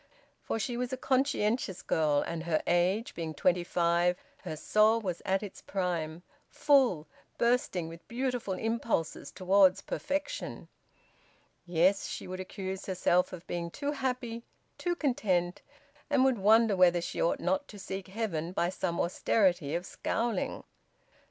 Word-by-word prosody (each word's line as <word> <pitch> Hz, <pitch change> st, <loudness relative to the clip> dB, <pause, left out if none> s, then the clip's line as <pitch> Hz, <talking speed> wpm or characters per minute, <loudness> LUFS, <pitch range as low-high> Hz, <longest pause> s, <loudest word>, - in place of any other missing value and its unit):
For -, -, -2 dB
she 235 Hz, +2 st, -2 dB
was 245 Hz, 0 st, -2 dB
a 260 Hz, -, -2 dB
conscientious 255 Hz, -7 st, 0 dB
girl, 150 Hz, -2 st, +2 dB
and 165 Hz, 0 st, -4 dB
her 160 Hz, -2 st, +1 dB
age 185 Hz, +6 st, +1 dB
being 160 Hz, -2 st, -5 dB
twenty 180 Hz, +4 st, +2 dB
five 175 Hz, +1 st, +2 dB, 0.2 s
her 155 Hz, -, -6 dB
soul 215 Hz, +7 st, +4 dB
was 185 Hz, -6 st, -4 dB
at 190 Hz, +2 st, +1 dB
its 200 Hz, -, -8 dB
prime, 175 Hz, -3 st, -2 dB, 0.3 s
full, 260 Hz, -, +3 dB, 0.3 s
bursting 235 Hz, -8 st, +1 dB
with 165 Hz, +1 st, -11 dB
beautiful 245 Hz, -5 st, -2 dB
impulses 225 Hz, -6 st, -2 dB
towards 190 Hz, 0 st, +4 dB
perfection. 290 Hz, -, -4 dB, 1.0 s
Yes, 180 Hz, +3 st, +3 dB
she -, -, -6 dB
would 185 Hz, 0 st, -6 dB
accuse 190 Hz, 0 st, -5 dB
herself 180 Hz, -1 st, +2 dB
of 180 Hz, -1 st, -9 dB
being 170 Hz, -1 st, -3 dB
too 285 Hz, -, -3 dB
happy, 250 Hz, -4 st, -3 dB, 0.4 s
too 350 Hz, -1 st, 0 dB
content, 190 Hz, -, 0 dB, 0.5 s
and 280 Hz, -3 st, +4 dB
would 260 Hz, -5 st, +2 dB
wonder 220 Hz, +1 st, +5 dB
whether 180 Hz, -1 st, +5 dB
she 175 Hz, -, -4 dB
ought 170 Hz, -, +1 dB
not 185 Hz, +2 st, 0 dB
to 210 Hz, -, -11 dB
seek 190 Hz, -1 st, -6 dB
heaven 185 Hz, -5 st, -3 dB
by 175 Hz, -1 st, +1 dB
some 180 Hz, -2 st, -2 dB
austerity 175 Hz, -4 st, +1 dB
of 175 Hz, +1 st, -2 dB
scowling. 230 Hz, 0 st, -2 dB
190 Hz, 145 wpm, -30 LUFS, 175-230 Hz, 1.0 s, wonder